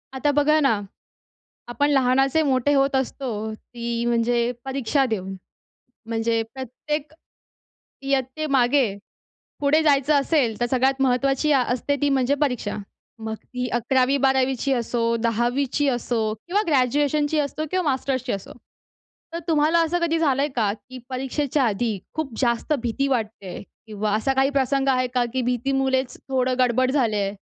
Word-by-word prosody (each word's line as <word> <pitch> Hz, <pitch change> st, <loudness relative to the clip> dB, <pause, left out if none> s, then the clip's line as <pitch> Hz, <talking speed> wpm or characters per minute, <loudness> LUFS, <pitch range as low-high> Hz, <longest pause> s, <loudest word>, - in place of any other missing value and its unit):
आता 290 Hz, +2 st, +1 dB
बघा 300 Hz, +2 st, +3 dB
ना, 275 Hz, -2 st, +3 dB, 1.0 s
आपण 285 Hz, +4 st, +1 dB
लहानाचे 270 Hz, +2 st, +3 dB
मोठे 260 Hz, +2 st, +2 dB
होत 275 Hz, 0 st, +2 dB
असतो. 265 Hz, 0 st, -2 dB, 0.2 s
ती 235 Hz, +1 st, -5 dB
म्हणजे 235 Hz, 0 st, +1 dB
परीक्षा 270 Hz, +1 st, 0 dB
देऊन. 195 Hz, -3 st, -3 dB, 0.7 s
म्हणजे 225 Hz, 0 st, 0 dB
प्रत्येक 280 Hz, +4 st, -5 dB, 0.9 s
इयत्तेमागे 270 Hz, -3 st, +1 dB, 0.6 s
पुढे 290 Hz, +2 st, +3 dB
जायचं 290 Hz, -1 st, +3 dB
असेल, 275 Hz, -6 st, +1 dB
तर 240 Hz, -, +2 dB
सगळ्यात 265 Hz, +1 st, +2 dB
महत्त्वाची 270 Hz, +3 st, +2 dB
आ 270 Hz, -3 st, +4 dB
असते 285 Hz, +3 st, -1 dB
ती 290 Hz, -, +3 dB
म्हणजे 270 Hz, 0 st, +2 dB
परीक्षा. 250 Hz, -8 st, -1 dB, 0.4 s
मग 220 Hz, 0 st, -4 dB
ती 250 Hz, +3 st, -5 dB
11वी 255 Hz, +3 st, +2 dB
12वी 265 Hz, 0 st, +1 dB
असो, 235 Hz, -1 st, -1 dB
10वी 240 Hz, +5 st, 0 dB
असो 240 Hz, -2 st, -1 dB, 0.2 s
किंवा 395 Hz, +4 st, +1 dB
ग्रॅज्युएशनची 290 Hz, +2 st, +2 dB
असो 295 Hz, +2 st, -3 dB
किंवा 370 Hz, -1 st, 0 dB
मास्टर्सची 260 Hz, -1 st, -2 dB
असो. 195 Hz, -1 st, -5 dB, 0.8 s
तर 335 Hz, -, -3 dB
तुम्हाला 315 Hz, +1 st, +3 dB
असं 340 Hz, +2 st, 0 dB
कधी 330 Hz, -1 st, +1 dB
झालं 280 Hz, -4 st, +2 dB
आहे 290 Hz, -, +1 dB
का? 210 Hz, -4 st, +2 dB
की 255 Hz, +4 st, -11 dB
परीक्षेच्या 270 Hz, +2 st, -1 dB
आधी 220 Hz, -1 st, 0 dB, 0.2 s
खूप 310 Hz, -4 st, -3 dB
जास्त 235 Hz, +3 st, 0 dB
भीती 245 Hz, +3 st, -1 dB
वाटते 215 Hz, -7 st, -3 dB
किंवा 210 Hz, 0 st, -5 dB
असा 245 Hz, +5 st, 0 dB
काही 270 Hz, +1 st, +3 dB
प्रसंग 275 Hz, 0 st, +1 dB
आहे 255 Hz, -1 st, +2 dB
का? 250 Hz, -1 st, +2 dB
की 260 Hz, 0 st, -1 dB
भीतीमुळेचं 260 Hz, +1 st, 0 dB
थोडं 255 Hz, -1 st, +1 dB
गडबड 255 Hz, +1 st, +2 dB
झाले 245 Hz, -6 st, +1 dB
आहे. 200 Hz, 0 st, -1 dB
260 Hz, 140 wpm, -23 LUFS, 240-280 Hz, 1.0 s, आ